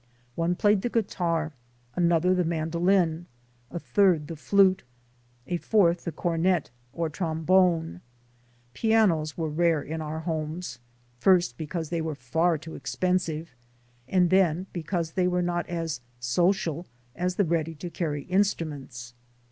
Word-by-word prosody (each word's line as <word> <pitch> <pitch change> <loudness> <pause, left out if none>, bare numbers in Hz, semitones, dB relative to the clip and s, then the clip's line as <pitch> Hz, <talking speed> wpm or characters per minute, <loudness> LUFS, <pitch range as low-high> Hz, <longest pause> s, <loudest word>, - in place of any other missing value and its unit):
One 165 +5 0
played 205 +1 +3
the 245 - -1
guitar, 170 -8 -1 0.4
another 175 +1 +3
the 180 -1 +2
man 160 -1 -2
dolin, 175 -1 +2 0.4
a 170 - -5
third 175 -4 +2
the 165 - -5
flute, 190 +4 +3 0.6
a 175 - -1
fourth 175 -3 +2
the 170 - -2
cornet 170 -1 0 0.2
or 165 +3 -2
trombone. 165 - +1 0.7
Pianos 190 - +2
were 165 -2 -1
rare 160 0 +1
in 160 +2 -5
our 155 +1 -4
homes; 160 -1 -4 0.4
first, 175 -6 +4
because 160 +2 -4
they 170 -1 -1
were 160 -2 -3
far 160 +6 +1
too 160 +2 -10
expensive, 170 -5 -2 0.5
and 180 +1 +2
then 185 -2 +3
be 175 - -3
cause 165 0 -2
they 180 0 +1
were 180 0 +1
not 175 0 -2
as 165 -6 -3 0.2
"social" 170 +5 0 0.3
as 180 +1 -1
the 200 - +2
ready 165 -1 -1
to 170 +3 -7
carry 150 -5 -3
instruments. 150 -10 -2
170 Hz, 140 wpm, -27 LUFS, 160-180 Hz, 0.7 s, first